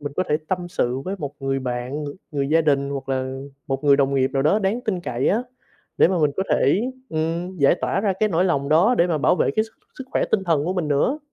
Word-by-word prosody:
mình 145 -1 -5
có 185 - +2
thể 150 - +3
tâm 180 -1 -2
sự 125 -6 -1
với 185 +7 -4
một 145 -3 -5
người 135 0 -1
bạn, 125 +4 -4
ng - - -4 0.2
người 140 -1 -1
gia 165 +2 +4
đình 140 -2 +1
hoặc 135 -1 -5
là 130 0 -2 0.3
một 135 +1 -3
người 140 -1 +6
đồng 140 -1 +1
nghiệp 130 -1 +2
nào 135 -1 +1
đó 175 +8 +3
đáng 210 +4 0
tin 190 -5 -1
cậy 125 -6 -1
á, 225 +5 +2 0.6
để - - +6
mà 185 -2 0
mình 150 -2 +3
có 190 - +1
thể 160 - +3 0.3
ừm, 165 +3 -2
giải 140 +3 +5
tỏa - - 0
ra 200 -2 +1
cái 215 - +3
nỗi 180 0 +1
lòng 140 -6 0
đó, 180 +11 +4
để 170 - +5
mà 160 -3 0
bảo 150 - +3
vệ - - +2
cái 220 - +3
sức 225 - -18 0.2
sức 260 - -6
khỏe - - +2
tinh 195 -3 +2
thần 160 -4 +1
của 180 - -1
mình 175 -5 -1
nữa. 150 - +1
155 Hz, 270 wpm, -22 LUFS, 140-185 Hz, 0.6 s, người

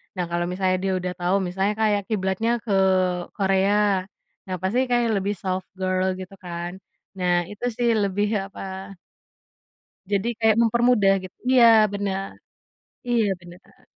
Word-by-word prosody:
Nah, 180 - -1
kalau 175 0 0
misalnya 185 0 0
dia 190 -1 0
udah 180 0 -3
tahu, 180 +2 +1
misalnya 195 +3 0
kayak 210 -2 +2
kiblatnya 205 +2 0
ke 210 -4 -2 0.6
Korea. 195 0 +2 0.4
Ya 185 - -4
pasti 245 +7 +1
kayaknya 240 -2 +2
lebih 200 +2 -2
soft 185 0 -3
girl, 185 0 0
gitu 185 +1 -9
kan. 175 +1 -6 0.4
Nah, 175 -1 +1
itu 210 +4 -6
sih 240 0 0
lebih 205 -1 +1 0.2
apa 190 0 -8 1.2
Jadi 200 +3 +1
kayak 220 -1 +4
mempermudah, 235 -3 +4
git 185 - -10 0.2
iya, 245 -2 +7 0.3
bener. 195 -1 -2 0.8
Iya, 235 -2 +3 0.2
bener. 175 +2 -17
195 Hz, 135 wpm, -23 LUFS, 185-210 Hz, 1.2 s, iya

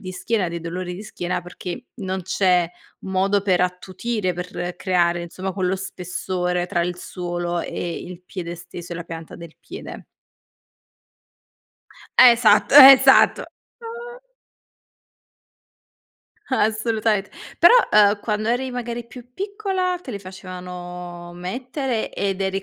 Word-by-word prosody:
di 185 -1 -7
schiena, 210 0 -1
di 170 0 -5
dolori 180 +2 -5
di 200 - -8
schiena, 180 -4 -4
perché 180 +6 -8
non 190 -4 -4
c'è 180 -2 +2 0.3
modo 195 +1 +1
per 185 -3 +2
attutire, 185 +3 -2
per 180 0 -5
creare, 175 -2 +1
insomma, 185 +3 -5
quello 185 0 0
spessore 180 -1 -3
tra 175 -1 0
il 180 +1 -3
suolo 175 -1 -4
e 170 -1 -4
il 180 0 -10
piede 175 -3 -6
stesso, 175 0 -9
e - - -5
la 170 - -5
pianta 165 -1 -9
del 170 -2 -11
piede. - - -9 2.1
Esatto, 235 -1 +6
esatto, 270 -1 +9
uh. 475 +1 -11 2.3
Assolutament 215 -3 0 0.3
Però, 345 +8 +7 0.2
uhm, 205 -1 +5
quando 215 0 -2
eri, 255 +2 0
magari, 240 -1 -5
più 245 0 -13
piccola 385 0 -2
te - - -8
le 205 - -5
facevano 180 -2 -9
mettere 245 - -3
ed 195 -1 -2
eri 195 0 -1
190 Hz, 120 wpm, -22 LUFS, 180-230 Hz, 2.3 s, esatto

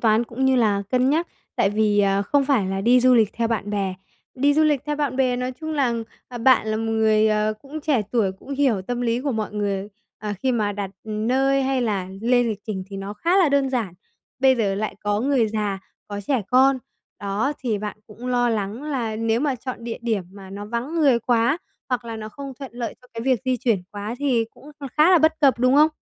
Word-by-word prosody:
toán, 225 +1 +3
cũng 240 +3 -3
như 265 -1 +4
là 210 -4 +2
cân 255 +1 +3
nhắc. 330 +3 +1 0.3
Tại 195 - +3
vì, 210 0 +2
à, 200 0 +2
không 280 +7 +2
phải 265 -9 +2
là 195 0 -2
đi 245 +4 +5
du 255 0 +5
lịch 220 -3 +3
theo 230 0 -1
bạn 210 -3 -2
bè. 195 -2 -1 0.4
Đi 285 +2 +3
du 310 - +4
lịch 295 -4 +2
theo 295 0 -1
bạn 280 -4 -1
bè, 255 -2 +2
nói 250 +1 -2
chung 315 0 -4
là, 270 -5 +1 0.3
à, 245 - -7
bạn 245 -1 +4
là 215 - 0
một 225 0 -2
người, 220 -1 +3
ờ, 215 0 +1
cũng 300 +3 -7
trẻ 285 -7 +1
tuổi, 210 -6 +2
cũng 190 +8 -15
hiểu 260 -9 +2
tâm 245 +5 -3
lý 235 0 0
của 280 0 -1
mọi 215 -2 -3
người, 200 -1 -2 0.3
ờ, 210 0 -4
khi 260 -1 +2
mà 210 -3 0
đặt 200 -1 -4
nơi 260 +6 +1
hay 265 -1 0
là 200 -5 -1
lên 245 0 +3
lịch 210 -2 -3
trình 190 -3 -4
thì 195 - -7
nó 195 +1 -6
khá 340 - +1
là 360 -6 +5
đơn 280 -1 +2
giản. 225 -9 -2 0.4
Bây 260 -1 +4
giờ 200 -4 +1
lại 215 +2 -3
có 205 0 0
người 255 -3 +2
già, 210 -2 -2 0.3
có 205 0 -4
trẻ 230 +2 0
con, 260 +1 +4 0.4
đó, 205 +8 -1
thì 225 -5 -1
bạn 210 0 -5
cũng 225 +3 -10
lo 245 -1 +2
lắng 215 +2 -2
là 245 -8 -2
nếu 225 +1 0
mà 285 -3 +1
chọn 245 -1 -7
địa 235 - -4
điểm 220 -5 0
mà 195 -1 -11
nó 200 +1 -6
vắng 235 +8 -3
người 280 -7 +4
quá 240 +6 +2 0.3
hoặc 250 -2 -1
là 230 -1 -5
nó 215 0 -6
không 275 +3 -8
thuận 270 -4 -8
lợi 235 -3 -4
cho 250 - -20
cái 230 - -4
việc 255 -2 +2
di 255 -1 +1
chuyển 230 -6 0
quá 205 +2 -5
thì 255 -5 +1
cũng 280 +5 -15
kh - - -6
khá 310 +4 +6
là 360 - +7
bất 315 +1 +2
cập, 270 -4 +4
đúng 255 +2 +3
không? 300 +2 +6
235 Hz, 245 wpm, -23 LUFS, 210-265 Hz, 0.4 s, là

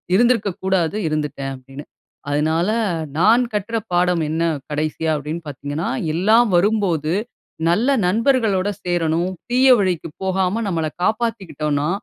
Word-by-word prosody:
இருந்திருக்க 230 -2 +3
கூடாது 190 0 +1
இருந்துட்டேன் 150 -3 -3
அப்பிடின்னு. 135 +2 -11 0.5
அதனால, 160 +5 +1 0.5
நான் 225 +7 +5
கற்ற 210 +2 -2 0.2
பாடம் 175 -1 +2
என்ன 160 +2 -1 0.3
கடைசியா? 155 +2 -1
அப்பிடீன்னு 150 +3 -5
பார்த்தீங்கன்னா, 145 +3 -4 0.2
எல்லாம் 215 +7 +4
வரும்போது 175 -5 +1 0.6
நல்ல 215 +10 +2 0.2
நண்பர்களோட 220 -2 +2
சேரணும். 175 0 0 0.2
தீய 255 +2 +4
வழிக்கு 180 -4 -1
போகாம 190 +3 0
நம்மள 165 -3 -1 0.2
காப்பாத்திக்கிட்டோன்னா, 180 - -1
175 Hz, 110 wpm, -20 LUFS, 155-210 Hz, 0.6 s, நான்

